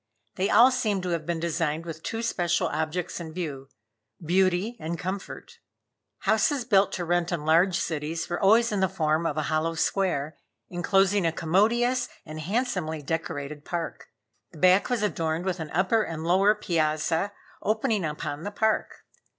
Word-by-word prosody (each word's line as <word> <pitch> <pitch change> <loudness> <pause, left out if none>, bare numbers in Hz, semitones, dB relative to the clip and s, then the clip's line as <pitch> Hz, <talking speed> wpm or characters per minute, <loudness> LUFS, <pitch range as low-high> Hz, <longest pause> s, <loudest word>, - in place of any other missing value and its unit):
They 190 +2 -1
all 240 +4 +7
seemed 215 -7 0
to 180 - -2
have 165 -2 -2
been 170 -1 -1
designed 165 -1 -1
with 160 -1 -7
two 225 +6 -4
special 175 -5 0
objects 160 +4 -3
in 160 -2 -7
view 145 -6 -5 0.5
beauty 185 +6 +1
and 165 +2 -4
comfort. 185 +3 -6 0.6
Houses 230 +4 +2
built 200 -5 +4
to 175 - -3
rent 175 +1 0
in 160 -4 -3
large 170 +3 +4
cities 160 -1 -3
were 175 0 -3
always 225 +4 +5
in 205 - 0
the 190 -1 +2
form 160 -3 0
of 150 - -3
a 155 - 0
hollow 155 +2 0
square, 160 -4 0 0.3
inclosing 195 +2 +2
a 165 - +2
commodious 230 +10 +1 0.2
and 155 0 -7
handsomely 180 - -2
decorated 150 -1 -4
park. 170 0 -5 0.4
The 165 - -14
back 185 +7 +4
was 245 -4 0
adorned 165 -4 -1
with 185 -1 -1
an 160 -2 -5
upper 190 +7 +2
and 160 -6 -4
lower 190 +5 +4
piazza 160 -1 0 0.3
opening 215 -2 0
upon 150 -1 -4
the 200 - -4
park. 220 +1 -1
175 Hz, 165 wpm, -26 LUFS, 160-200 Hz, 0.6 s, all